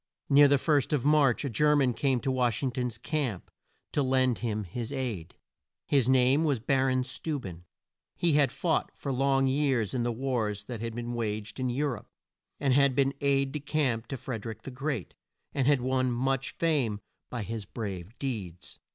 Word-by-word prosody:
Near 145 +1 +7
the 140 0 +4
first 145 0 +1
of 140 -4 0
March 145 -3 +4
a - - -1
Ger 150 +6 +3
man 135 -4 +3
came 130 +1 +1
to 135 - 0
Wash 125 -1 0
ing 130 - +1
ton's 125 -2 -3
camp 140 - -3 0.4
to 145 - +1
lend 130 -2 +2
him 110 -3 -2
his 115 +7 -5
aid. 120 - -4 0.5
His 135 -4 +2
name 130 +3 +4
was 145 -6 +1
Bar 135 +2 +2
on 130 0 +1
Steu 145 +4 -3
ben. 90 -6 -9 0.5
He 170 -3 +1
had 145 -2 +4
fought 165 -3 0
for 140 - -3
long 135 +1 +2
years 130 -5 +1
in 125 - 0
the 120 0 0
wars 115 -5 -2
that 115 0 -6
had 115 -1 -4
been 120 0 -4
waged 110 -1 -3
in 130 -1 0
Eu 135 +5 0
rope, 125 -7 -4 0.5
had 140 -1 +3
been 135 0 +2
aide 140 -1 +2
de 150 - -3
camp 135 -6 -1
to 135 - -4
Fred 115 -4 -5
er - - -3
ick 110 - -8
the 135 - -7
Great, 135 - -3 0.4
and 135 -2 +1
had 145 -3 +4
won 130 0 +1
much 135 +2 -1
fame 140 -11 +1 0.3
by 120 -3 -4
his 110 +1 -5
brave 100 -1 -6
deeds. 100 - -5
130 Hz, 195 wpm, -29 LUFS, 115-140 Hz, 0.5 s, Near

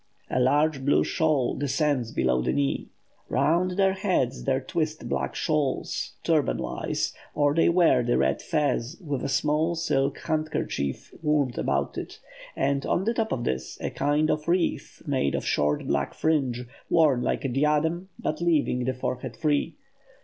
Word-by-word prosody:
A - - +1
large 145 +2 +2
blue 140 - +3
shawl 155 -6 +1
descends 140 -4 0
below 65 - +1
the 65 +1 0
knee. 70 -1 0 0.4
Round 170 +7 +1
their 195 -1 +4
heads 185 -10 0
they 135 -1 +2
twist 155 +2 -3
black - - -2
shawls, 150 -5 -1
turban - - +2
wise, - - -2 0.2
or 145 -1 +3
they 165 +2 +4
wear 170 -7 +4
the 120 0 +1
red 65 0 +1
fez, 150 -2 -1
with 145 -7 -3
a - - -2
small 155 +4 +1
silk 140 -4 0
handkerchief 155 - -2
wound 150 -5 +1
about 70 +1 -1
it; - - -8 0.4
and 140 0 0
on 185 - 0
the 230 +3 +1
top 225 -2 -1
of 120 - -1
this, 65 - -3
a - - -3
kind 150 +2 +1
of 150 +1 -2
wreath 175 0 -1
made 130 - 0
of - - -3
short 75 0 +1
black 70 0 -1
fringe, 130 -6 0 0.2
worn 150 -7 +4
like - - -1
a - - +3
diadem, 150 +7 +1
but 155 +2 -3
leaving 150 -7 +1
the 130 0 -1
forehead 125 0 -4
free. 150 +1 0
145 Hz, 165 wpm, -26 LUFS, 125-160 Hz, 0.4 s, their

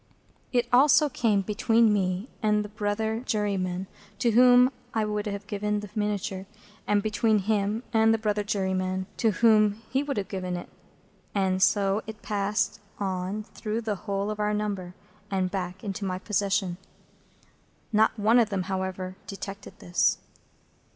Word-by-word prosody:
It 245 -1 +1
also 290 +3 +6
came 215 -6 +1
between 225 +2 +3
me 190 +1 0
and 210 -1 +2
the - - -8
brother 215 +1 -1
juryman 195 -5 -1 0.3
to 235 +3 +2
whom 250 +2 +6 0.2
I 220 -1 +2
would 210 0 -2
have 200 0 -4
given 210 0 -2
the 210 -2 -9
miniature, 205 -2 -2 0.4
and 205 -1 +2
between 215 0 +2
him 210 +2 0
and 225 0 +5
the 225 - +3
brother 210 -1 0
juryman 190 -2 -1
to 225 - +3
whom 215 0 +3
he 265 - +2
would 285 -4 -3
have 200 - -2
given 185 -2 -3
it, - - -8 0.7
and 190 -1 +1
so 195 +1 +3 0.2
passed 205 +1 0
it - - -30 0.2
on 190 +1 -2
through 215 +1 -4
the 220 -2 -1 0.2
whole 200 +1 -1
of 210 - -6
our 210 0 +1
number, 200 -4 -3 0.3
and 185 -2 0
back 185 -1 -4
into 200 0 -4
my 185 -1 -2
possession. 195 -2 0 1.2
Not 220 +2 +3
one 220 +3 +4
of 225 -3 +3
them, 195 -3 -1
however, 185 0 -4
detected 195 0 -8
this. 175 0 +1
205 Hz, 155 wpm, -27 LUFS, 190-220 Hz, 1.2 s, also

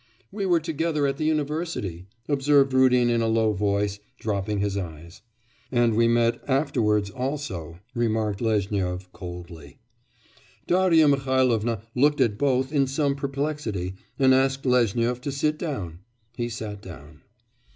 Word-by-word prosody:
'We 200 -1 -3
were 175 -2 +4
together 160 -1 -1
at 135 0 -1
the 155 - -2
university,' 150 - -2 0.2
observed 140 -1 +3
Rudin 125 -2 +4
in 120 -1 +2
a 115 - +1
low 110 -1 +2
voice, 100 0 0 0.2
dropping 105 -1 -2
his 100 0 -1
eyes. 85 -1 -7 0.5
'And 120 -2 +3
we 115 +1 +4
met 115 0 +2
afterwards 110 -7 +1
also,' 125 - -4 0.2
remarked 110 -4 -1
Lezhnyov 95 -4 -1
coldly. 85 -5 -9 0.9
Darya 175 -4 +4
Mihailovna 130 -6 +1
looked 145 +3 +3
at 115 -5 +1
both 135 0 +1
in 140 -2 +3
some 140 +1 0
perplexity 140 -9 -3 0.2
and 130 -1 +5
asked 135 +1 +1
Lezhnyov 120 -1 +2
to 140 +1 -3
sit 150 +2 -1
down. 95 - -4 0.4
He 120 0 -2
sat 110 -3 -6
down. 75 -5 -12
120 Hz, 135 wpm, -25 LUFS, 100-140 Hz, 0.9 s, and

